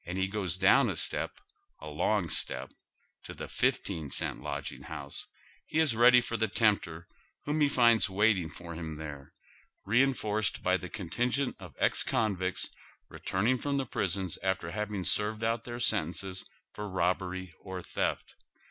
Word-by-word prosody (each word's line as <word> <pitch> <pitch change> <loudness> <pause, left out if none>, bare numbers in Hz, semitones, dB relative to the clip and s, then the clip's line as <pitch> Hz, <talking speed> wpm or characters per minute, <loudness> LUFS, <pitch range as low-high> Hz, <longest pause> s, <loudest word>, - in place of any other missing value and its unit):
he 95 +2 -1
goes 95 -3 -2
down - - +5
a - - -2
step, - - 0 0.5
a - - -10
long 85 +5 +1
step, - - -1 0.5
to - - -8
tlie - - -6
fifteen 80 -3 -1
cent - - -1
lodg - - -4
ing - - -11
house, 75 -3 -6 0.4
he 155 - -2
is 155 -7 +4
ready 125 +2 +7
for 115 -1 -3
the 110 0 +1
tempter 95 -6 +1 0.4
whom 150 +1 0
he 145 - +5
finds 115 -6 +5
waiting 95 -3 +2
for 85 +2 -9
him 80 -1 -5
there, 70 -3 -8 0.5
reinforced 110 -3 +2
hy 90 - +3
tlie 90 -1 -5
contingent 125 +8 -1
of 90 -6 -11
ex - - +3
convicts 95 -4 0 0.4
returning 115 +7 0
from 140 +1 -1
the 135 - 0
prisons 95 -5 -1
after 95 -3 -1
having 105 -1 -3
seiTed 105 +4 +1
out 115 0 0
their 120 0 -5
sentences 95 -3 0 0.3
for 105 0 -5
robbery 95 -1 -1
or 95 -2 -7
theft. - - -2
100 Hz, 155 wpm, -30 LUFS, 90-115 Hz, 0.5 s, ready